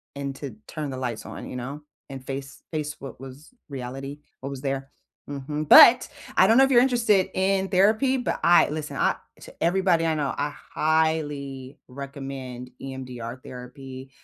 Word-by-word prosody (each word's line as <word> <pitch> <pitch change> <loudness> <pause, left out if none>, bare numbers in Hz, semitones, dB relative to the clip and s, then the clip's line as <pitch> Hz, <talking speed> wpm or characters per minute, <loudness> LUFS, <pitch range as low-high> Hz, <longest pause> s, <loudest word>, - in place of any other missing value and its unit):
and 140 -1 -4
to 135 -7 -7
turn 150 -2 -4
the 130 - -5
lights 120 -4 -4
on, - - -8
you - - -7
know, 135 +4 -5 0.3
and 135 -1 -8
face 135 +1 -6
face 150 -2 -3
what 135 -3 -9
was 135 - -11 0.2
reality, 135 +2 -6 0.2
what 135 - -5
was 135 -1 -6
there. 135 -1 -3 0.4
Mhm. 150 +2 -4
But, 250 - +9 0.3
I 190 - +7
don't 225 +3 +5
know 265 - +8
if 270 - +3
you're 240 -2 +7
interested 230 -7 +3
in 190 0 +1
therapy, 215 +8 +3
but 245 - -2
I 175 0 +6
listen, 155 0 -5
I - - +2 0.2
to - - -12
everybody 175 -1 +3
I 160 -1 +1
know, 145 -3 -1
I 145 +1 0
highly 145 -4 -1
recommend 135 -2 -7
EMDR 125 -3 -6
therapy. 130 +1 -9
140 Hz, 170 wpm, -25 LUFS, 135-165 Hz, 0.4 s, But